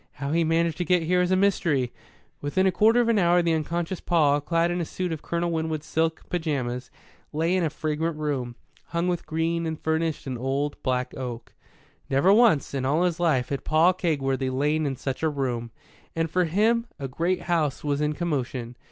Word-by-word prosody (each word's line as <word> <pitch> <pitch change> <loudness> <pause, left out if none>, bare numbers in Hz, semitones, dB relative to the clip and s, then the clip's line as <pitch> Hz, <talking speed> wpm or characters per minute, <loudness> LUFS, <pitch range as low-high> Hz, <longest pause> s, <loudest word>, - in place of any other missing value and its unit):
"How 140 +1 -4
he 165 +1 +2
managed 165 0 +1
to - - +1
get 175 0 +2
here 180 +2 +2
is 180 - +1
a 185 - +3
mystery!" 170 -10 +1 0.5
Within 165 +7 +1
a 190 - +4
quarter 225 +6 +4
of 235 - 0
an 230 -3 +3
hour 175 -1 +4
the 165 -1 +2
unconscious 165 +3 -2
Paul, 145 -4 +2
clad 165 +3 +1
in 175 0 -1
a - - 0
suit 180 +2 -3
of 160 -2 -4
Colonel 170 0 -1
Winwood's 160 -2 -2
silk 160 0 -1
pyjamas, 130 -7 -2 0.4
lay 165 +4 +1
in 185 - +1
a 160 - +1
fragrant 155 +1 -2
room, 135 -6 -2 0.3
hung 170 +1 -2
with 175 -2 -2
green 165 +1 -1
and 160 -1 -4
furnished 160 0 -1
in 130 -3 -4
old, 140 +3 -2
black 125 -1 -1
oak. 120 -3 -6 0.6
Never 140 +9 +4
once, 215 - +4
in 135 -2 -2
all 150 +6 +2
his 175 -2 0
life, 150 -8 +1
had 140 - -3
Paul 160 +4 +4
Kegworthy 135 -7 -1
lain 150 +3 +1
in 135 - -2
such 135 0 -4
a 160 - +2
room. 125 -5 -2 0.5
And 165 -1 -1
for 180 +1 +2
him 225 +7 +2
a 140 - -4
great 170 +8 -1
house 160 -6 0
was 145 -1 0
in 150 0 +1
commotion. 130 -7 -3
160 Hz, 205 wpm, -25 LUFS, 140-175 Hz, 0.6 s, a